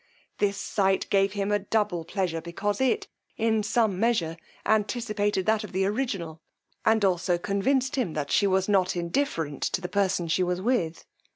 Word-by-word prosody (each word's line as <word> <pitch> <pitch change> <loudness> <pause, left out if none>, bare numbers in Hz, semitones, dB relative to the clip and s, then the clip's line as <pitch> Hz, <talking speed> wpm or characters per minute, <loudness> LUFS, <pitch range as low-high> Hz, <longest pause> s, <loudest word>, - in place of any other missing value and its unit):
This 200 -1 +1
sight 195 -1 +1
gave 195 0 +3
him 200 0 -1
a 205 - +3
double 205 -4 0
pleasure, 175 -3 -2
because 200 +6 -2
it, 405 - +1 0.3
in 220 -1 +2
some 210 -2 +1
measure, 215 -8 +1 0.3
anticipated 210 -3 0
that 220 0 +2
of 210 - -9
the 190 +1 +1
original, 195 -8 -2 0.4
and 220 -2 +3
also 180 -1 +1
convinced 255 +9 0
him 220 -11 0
that 145 -2 -3
she 200 - +4
was 190 0 +2
not 190 -3 +2
indifferent 170 - -2
to - - 0
the 180 - -4
person 195 -3 0
she 165 +3 +1
was 180 0 0
with. 185 -7 -1
200 Hz, 170 wpm, -27 LUFS, 180-220 Hz, 0.4 s, she